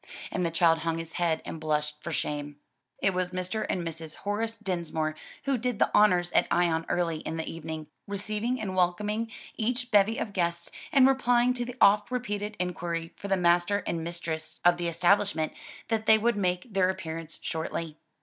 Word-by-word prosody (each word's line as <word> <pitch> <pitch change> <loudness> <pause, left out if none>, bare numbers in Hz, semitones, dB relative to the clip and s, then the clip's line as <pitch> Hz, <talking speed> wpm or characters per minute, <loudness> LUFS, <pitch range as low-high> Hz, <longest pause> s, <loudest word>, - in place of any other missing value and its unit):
And 185 - -1
the 170 - +1
child 165 0 +4
hung 165 0 -1
his 165 0 -6
head 165 -2 +1
and 165 - -6
blushed 150 -1 -1
for 170 - -5
shame. 145 -1 -3 0.5
It 195 - +3
was 180 0 0
Mr. 185 +4 -3
and 180 - 0
Mrs. 165 -1 -6
Horace 225 +3 -2
Dinsmore 170 -6 -2 0.3
who 275 -3 +1
did 245 -1 -1
the - - +2
honors 180 -4 +4
at - - +3
Ion 170 -2 +2
early 170 -2 +1
in 160 +1 -5
the 160 - -3
evening, 160 -1 -5 0.2
receiving 215 +5 -2
and 195 -4 -3
welcoming 210 +5 +1 0.3
each 245 +2 -1
bevy 210 +2 +4
of 205 - -3
guests, 170 -2 -1 0.2
and 270 -4 +7
replying 245 -2 +3
to 245 -1 -3
the 245 0 -7
oft 205 +1 +5
repeated 210 -4 -3
inquiry 170 -2 -3
for 200 - -7
the 195 -1 +2
master 175 +3 +3
and 165 -1 -2
mistress 165 -2 -5
of 175 0 +6
the 175 -1 -2
establishment, 175 0 +2 0.4
that 220 -1 0
they 220 - +8
would 235 +1 +2
make 185 +2 -1
their 185 -1 +3
appearance 165 -3 -5
shortly. 160 -1 -3
180 Hz, 185 wpm, -28 LUFS, 165-210 Hz, 0.5 s, they